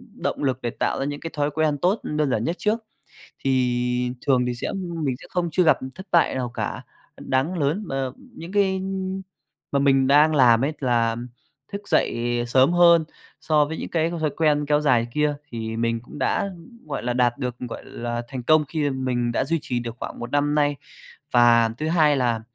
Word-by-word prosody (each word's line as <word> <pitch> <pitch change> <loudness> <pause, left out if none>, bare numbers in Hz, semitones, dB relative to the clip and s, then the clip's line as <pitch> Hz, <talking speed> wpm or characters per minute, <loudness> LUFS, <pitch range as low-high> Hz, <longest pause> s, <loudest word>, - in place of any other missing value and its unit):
động - - -3
lực, 130 -3 +1
ưm, - - -39
để 120 - -1
tạo - - -2
ra 135 - -1
những 145 0 -4
cái 165 - -6
thói 145 0 +1
quen 155 0 +1
tốt, 185 +9 +1
ừm, 150 - -4
đơn 150 -3 +1
giản 110 -3 0
nhất 170 +7 -1
trước. 215 +2 +1 0.6
Thì 125 -1 0 0.2
thường 125 -3 +3
thì 125 - -1
sẽ 120 - -4
mình 170 -8 -3
sẽ - - -12
không 175 -2 -1
chưa 180 +3 +2
gặp 160 - +4 0.2
thất 190 +1 -10
bại 170 - +3
nào 125 -2 -2
cả - - -3 0.4
đáng 145 +7 -1
lớn, 155 +9 0
ờ, 135 -1 -2
những 245 -10 -12
cái, 200 -2 +3
ưm, 190 0 -3 0.5
mà 140 - +2
mình 135 -1 +3
đang 150 +3 +5
làm 125 -3 +5
ấy, 150 - 0
là 115 -3 +1 0.6
thức 200 0 -6
dậy 120 0 +1
sớm 130 +6 +4
hơn 170 -2 +6 0.4
so 150 -2 +3
với 160 +2 -5
những - - -5
cái 165 0 0
thói 160 -3 -1
quen 150 -2 +2
kéo 150 0 +3
dài 120 -6 +3
kia 150 -1 +1 0.2
thì 115 -1 -4
mình 115 0 0
cũng 135 - -11
đã, 195 +9 0 0.4
gọi 145 - -4
là 120 +1 -1
đạt 120 0 +1
được, 125 -3 -3
gọi 125 -2 -7
là 120 0 -4
thành 130 -2 -5
công 155 +3 +4
khi 150 -1 -1
mình 125 -3 -1
đã 130 - 0
duy 165 +3 0
trì 120 -1 -2
được 120 0 -6
khoảng - - -6
1 120 +1 -6
năm 145 +1 +2
nay. 145 -1 +2 0.6
Và 120 -1 +5
thứ 155 - -2
hai 155 -3 +4
là, 120 -3 +1
140 Hz, 215 wpm, -23 LUFS, 125-160 Hz, 0.6 s, hơn